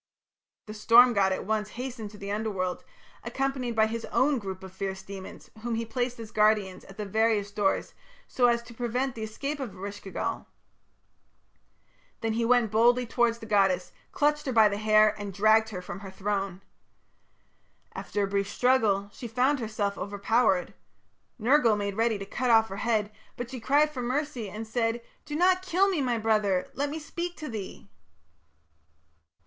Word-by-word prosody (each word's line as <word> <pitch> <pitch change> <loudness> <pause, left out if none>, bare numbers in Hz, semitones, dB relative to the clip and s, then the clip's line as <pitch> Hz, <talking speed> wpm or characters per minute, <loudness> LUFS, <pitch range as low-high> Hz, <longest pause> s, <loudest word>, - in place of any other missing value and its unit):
The 215 - -8
storm 240 +3 +6
god 195 -2 +3
at 190 - -2
once 210 0 -1
hastened 245 -4 -5
to 210 - -13
the 200 0 -6
Underworld, 200 -4 -2 0.4
accompanied 270 -3 -2
by 220 0 +4
his 225 +1 -4
own 275 0 +2
group 190 -3 -7
of 190 -1 -10
fierce 190 0 -4
demons, 195 -1 -10
whom 235 0 -2
he 230 +1 -2
placed 245 +2 -3
as 225 -1 -8
guardians 210 -3 +2
at 195 - -14
the 210 - -4
various 215 0 +1
doors 205 -2 0 0.3
so 245 -1 +3
as 235 0 +2
to 235 0 -13
prevent 245 +3 -2
the 225 - -8
escape 275 +7 -4
of 250 -8 -5
Eresh 200 +2 -7
ki 195 - -9
gal. - - -3 1.7
Then 225 -1 -1
he 230 +1 0
went 235 -2 +3
boldly 240 +3 +4
towards 235 0 +1
the 230 - -10
goddess, 195 -4 +2 0.2
clutched 295 0 +1
her - - 0
by 220 -3 +6
the 200 0 -2
hair, 215 0 +5
and 200 -1 -5
dragged 215 +2 +4
her 180 -4 -6
from 180 - -7
her 195 -1 -9
throne. 195 -1 -3 1.3
After 205 - -3
a - - 0
brief 200 0 -1
struggle, 215 -5 +2
she 240 - -7
found 255 +5 +1
herself 215 -3 -2
overpowered. 200 -1 +1 0.6
Nergal 240 -1 +4
made 200 -1 -2
ready 225 0 +1
to 195 - -6
cut 245 +5 -2
off 225 -1 +5
her 195 - -6
head, 215 -2 0 0.3
but 245 +1 -5
she 260 - -5
cried 290 +6 +3
for 260 -4 -5
mercy 255 -3 -2
and 215 +4 -6
said: 230 +1 -1 0.2
"Do 295 - -5
not 365 +3 +3
kill 375 +1 +2
me, 355 -7 0
my 245 -3 0
brother! 215 -4 +1
Let 285 +1 -1
me 305 - -4
speak 345 +3 -5
to 310 - -6
thee." 210 -5 -7
220 Hz, 180 wpm, -28 LUFS, 200-245 Hz, 1.7 s, storm